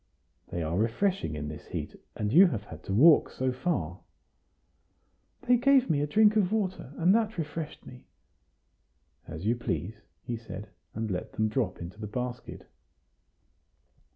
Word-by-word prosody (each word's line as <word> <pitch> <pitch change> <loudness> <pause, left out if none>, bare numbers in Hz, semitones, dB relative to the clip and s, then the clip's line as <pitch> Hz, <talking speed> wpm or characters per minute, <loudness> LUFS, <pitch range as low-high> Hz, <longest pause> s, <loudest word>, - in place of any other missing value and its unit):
"They 85 - -3
are 80 +4 -1
refreshing 115 - 0
in 75 0 -4
this 75 0 -8
heat, - - -5 0.2
and 105 +1 -2
you 185 +4 +8
have 115 - -3
had - - -11
to - - -5
walk 145 +10 +6
so 130 0 -1
far." 130 +8 -2 1.4
"They 250 -1 +4
gave 265 +1 +4
me 145 -2 +1
a 145 - 0
drink 215 +7 +4
of 200 -3 +2
water, 190 - -2
and 175 +3 +4
that 220 -2 +1
refreshed 155 -1 -5
me." 125 - -13 1.2
"As 80 +5 -7
you 115 +3 +2
please," 105 -1 -4 0.2
he 120 - -4
said, 105 -3 -9 0.3
and 110 -1 -3
let 90 -1 -4
them 110 -1 0
drop 120 +1 -1
into 85 +5 -8
the 105 - -4
basket. 125 +3 -5
125 Hz, 155 wpm, -29 LUFS, -, 1.4 s, you